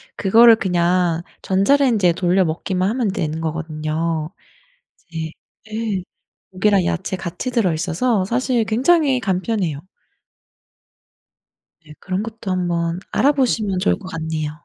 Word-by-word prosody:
그거를 225 +4 +6
그냥 175 -3 +1 0.2
전자레인지에 205 -1 +3
돌려 185 +2 +2
먹기만 180 +4 -1
하면 235 -1 0
되는 160 -5 -3
거거든요. 160 0 -3 0.8
이제 160 -1 -4 0.4
네 215 -3 -3 0.5
고기랑 195 0 +2
야채 85 - -2
같이 175 +8 -5
들어있어서 190 +1 0
사실 240 +2 0
굉장히 265 +4 +2
간편해요. 190 - -1 2.1
네 150 - -13
그런 185 +2 -3
것도 225 -3 -6
한번 175 -1 -1
알아보시면 240 -9 +1
좋을 190 - +1
것 195 - -11
같네요. 160 -3 -3
185 Hz, 270 characters per minute, -20 LUFS, 165-225 Hz, 2.1 s, 그거를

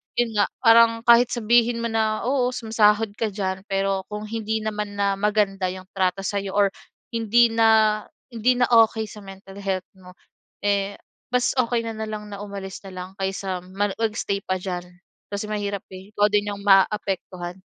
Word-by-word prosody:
yun 240 -1 +1
nga 205 - +4 0.2
parang 230 -1 +6
kahit 235 +1 +7
sabihin 235 0 +2
mo - - 0
na, 220 -1 0
oo 255 -2 +2
sumasahod 220 -2 +2
ka 225 - +1
diyan 190 -1 -3
pero 195 -1 -1
kung 210 0 -5
hindi 220 0 -2
naman 210 -1 -4
na 200 -1 +1
maganda 205 -2 +1
yung 185 0 -7
trato 190 0 0
sa'yo 200 -1 -3
or 200 -1 +4 0.4
hindi 230 +1 +3
na, 220 -1 +4 0.3
hindi 240 +3 +2
na 250 - +3
okey 225 -1 +4
sa 210 - -10
mental 195 0 -12
health 190 -2 -2
mo, 180 -1 -15 0.5
eh, 200 0 0 0.4
mas 250 -1 +2
okey 235 -1 +1
na 225 - -3
nalang 215 -1 -5
na 200 - -7
umalis 200 -2 -7
na - - -9
lang 185 - -10
kaysa 190 -1 -2
mani 195 +2 -2
mag-stay 210 -3 -1
pa 185 - -1
diyan 180 -1 -4 0.5
kasi 200 - -3
mahirap, 205 -2 -3
eh, 190 +2 -10
ikaw 205 0 +4
din 205 0 +2
yung 200 0 -7
maaapektuhan. 190 -2 +1
205 Hz, 175 wpm, -23 LUFS, 195-225 Hz, 0.5 s, kahit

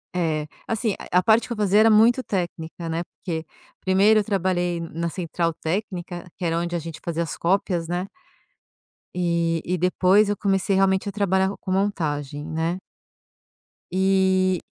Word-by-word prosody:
É, 155 -3 0 0.2
assim, 225 -2 -1 0.2
a 180 - +3
a - - -1
parte 225 +1 +4
que 240 - -3
eu - - -8
fazia 205 0 +3
era 225 - +6
muito 230 +4 +5
técnica, 170 -3 -4
né, 165 +1 -1
porque 165 -2 -6 0.4
1º, 200 +3 +4
eu - - -4
trabalhei 180 -4 0
na 165 0 -3
central 170 -1 -2
técnica, 175 0 -4
que 180 - -4
era 165 0 +1
onde 175 0 -2
a - - 0
gente 165 0 -8
fazia 170 0 -1
as 165 - -5
cópias, 175 -2 0
né. 180 +2 -2 1.1
E 170 -2 0
e 180 +1 0
depois 185 +4 +3
eu 205 - 0
comecei 195 0 +1
realmente 190 +1 +2
a - - -4
trabalhar 190 -1 +1
com 185 - -5
montagem, 150 -7 -1
né. 165 +3 -2 1.1
E 190 -1 +2
180 Hz, 165 wpm, -24 LUFS, 170-195 Hz, 1.1 s, era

